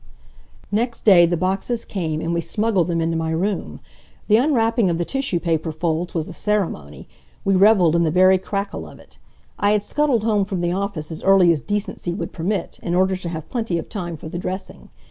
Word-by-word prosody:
Next 230 +3 -1
day 175 -5 +7
the 175 0 0
boxes 195 +6 -1
came, 160 -5 -3
and 165 +1 -2
we 170 - 0
smuggled 210 -1 0
them 170 -2 0
into 165 0 0
my 160 0 -1
room. 185 +5 -2 0.5
The 215 - +6
unwrapping 230 -5 +2
of 170 - 0
the 175 - -1
tissue 270 -8 -1
paper 165 -2 -1
folds 165 +2 -2
was 160 -2 -1
a - - -8
ceremony. 180 - -2 0.4
We 195 - +3
reveled 190 -4 +5
in 170 - +3
the 165 - +2
very 185 +3 +5
crackle 200 +1 -4
of - - -14
it. - - -17 0.4
I 205 +1 +3
had 210 -1 +1
scuttled 275 -3 +1
home 215 -3 +2
from 190 -3 -3
the 175 0 0
office 185 -5 -3
as 160 - -5
early 190 -3 +5
as 155 -4 0
decency 205 -4 -3
would - - -5
permit, 190 +5 -3
in 170 - -2
order 190 +1 +2
to 175 -2 -6
have 160 -2 -6
plenty 225 -8 -1
of 165 - -6
time 175 -6 -5
for 155 - -9
the 175 +2 -5
dressing. 185 +1 -6
185 Hz, 210 wpm, -21 LUFS, 170-210 Hz, 0.5 s, day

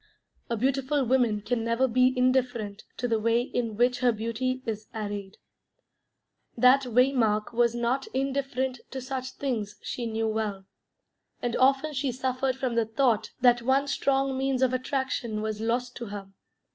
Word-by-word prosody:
A 235 - -1
beautiful 270 +3 +1
woman 235 -4 +2
can 230 +1 -1
never 230 +3 +2
be 255 +1 +4
indifferent 245 -5 0
to 245 - -1
the 225 -2 +1
way 230 +2 +2
in 230 -4 -3
which 245 +1 +2
her 250 -1 +4
beauty 235 +4 -2
is 215 -2 -4
arrayed. 205 -2 -5 1.2
That 255 +3 +5
Waymark 235 -3 +2
was 235 0 +2
not 240 +3 0
indifferent 265 -1 -2
to 265 - -5
such 260 0 -5
things 225 -7 -3
she 240 -2 -3
knew 225 0 -1
well, 215 -3 -2 0.7
and 240 -1 -2
often 270 +4 +3
she 270 -1 -1
suffered 255 +1 -1
from 255 -2 -2
the 230 -1 +2
thought 225 -1 +1
that 245 -1 +5
one 265 +3 +2
strong 275 -1 +1
means 265 -1 0
of 255 -1 +2
attraction 255 -4 -2
was 215 0 -3
lost 240 +2 -1
to 235 - -6
her. 200 -1 -7
245 Hz, 160 wpm, -27 LUFS, 225-265 Hz, 1.2 s, That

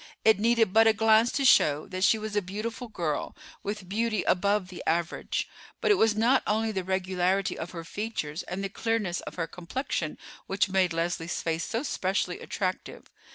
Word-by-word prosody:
It 220 -2 +6
needed 225 -3 +3
but 225 +1 +6
a 220 - +6
glance 220 +2 +4
to 275 - 0
show 150 - +5
that 185 0 -3
she 220 - +5
was 215 -1 -5
a 205 - +3
beautiful 215 +6 -5
girl, 170 -9 -3 0.3
with 205 -2 -5
beauty 215 +1 0
above 200 0 +1
the 180 - -8
average; 170 +1 -1 0.3
but - - +2
it 410 - +5
was 220 -1 +4
not 235 +5 +3
only 220 +1 +1
the 190 -3 -2
regularity 190 +1 0
of 165 - -5
her 170 -2 -7
features 165 -5 -4
and 190 +2 -5
the 195 - -2
clearness 210 -4 -1
of - - -8
her 165 - -1
complexion 180 - -4 0.3
which 195 +1 +1
made 185 -2 +2
Leslie's 165 0 -2
face 165 0 -1
so 230 +3 -2
specially 185 -8 -1
attractive. 185 -2 -4
195 Hz, 185 wpm, -28 LUFS, 180-220 Hz, 0.3 s, It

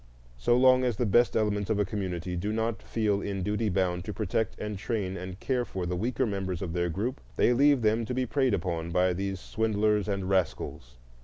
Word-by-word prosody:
So 120 - +3
long 130 0 +5
as 125 -3 +1
the 125 - +1
best 120 +3 +3
elements 105 -2 0
of 110 - +2
a 105 - +2
community 90 -3 -3
do 100 +5 -2
not 110 +1 -1
feel 105 -3 0
in 100 -2 -3
duty 105 +2 0
bound 90 -2 0
to 105 - -4
protect 110 +1 -1
and 105 0 -4
train 100 -2 -2
and 95 +1 -7
care 125 -2 0
for 95 -6 -4
the 90 +1 -2
weaker 120 +7 0
members 95 -4 -3
of 85 -3 -4
their 85 0 0
group, 105 +10 -3
they 120 - +4
leave 140 0 +4
them 110 +2 +2
to 125 - -3
be 130 0 +1
preyed 130 -2 +2
upon 85 -2 -3
by 90 +1 +2
these 95 +1 -3
swindlers 105 -1 0
and 100 -2 -2
rascals. 85 -9 -1
105 Hz, 215 wpm, -28 LUFS, 95-115 Hz, -, long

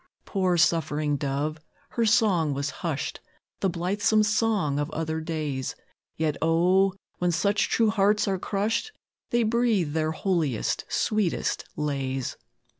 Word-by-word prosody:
Poor, 185 -3 +1
suffering 155 -3 +2
dove! 145 +3 -2 0.3
her 230 -1 0
song 195 - +3
was 140 +1 -2
hushed, 155 -6 -3 0.4
The 195 - +1
blithesome 200 +5 +2
song 210 -9 +1
of 145 +1 -1
other 160 0 -3
days, 155 -5 -3 0.4
Yet, 155 -2 -1
O! 180 +4 +3 0.3
when 180 0 +2
such 200 +5 +1
true 225 -2 +3
hearts 210 0 +2
are 190 -2 0
crushed, 220 - -1 0.4
They 240 0 +2
breathe 220 -8 +1
their 155 0 0
holiest, 160 - -1
sweetest 210 -5 0
lays. 135 -3 -2
175 Hz, 125 wpm, -26 LUFS, 150-210 Hz, 0.4 s, song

